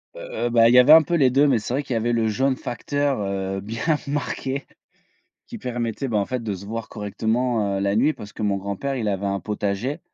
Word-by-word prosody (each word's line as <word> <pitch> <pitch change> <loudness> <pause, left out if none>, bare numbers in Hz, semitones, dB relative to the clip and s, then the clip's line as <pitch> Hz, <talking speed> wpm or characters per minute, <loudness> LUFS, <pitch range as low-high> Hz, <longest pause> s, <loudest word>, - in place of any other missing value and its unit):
Heu, - - -9
heu, - - -2
bah, 115 -1 +5
il - - +4
y 125 - +8
avait 125 +4 +6
un 160 0 +9
peu 165 - -4
les 140 -6 +4
2, 140 +4 +4
mais 130 -5 +3
c'est 110 +3 -5
vrai 140 +3 0
qu'il 135 - -4
y - - +1
avait 120 +2 0
le 115 -1 +1
jaune 130 +5 +1
facteur, 140 +2 -2
heu, 95 -1 -3
bien 115 +3 -5 0.2
marqué, 140 -1 -3 0.8
qui 235 - -8
permettait 120 - -3
ben, 110 -4 0
en 100 - +1
fait 125 +2 -3
de 110 -3 -3
se 95 +2 -10
voir 110 +1 -5
correctement, 110 0 -1
heu, - - -2
la 100 +1 0
nuit. 140 +8 +3
Parce 105 -6 -11
que - - -8
mon 100 -2 +1
grand-père 100 +8 -3
il 115 -4 -2
avait 100 -1 -1
un 100 0 -1
potager 105 - -3
115 Hz, 250 wpm, -23 LUFS, 100-135 Hz, 0.8 s, un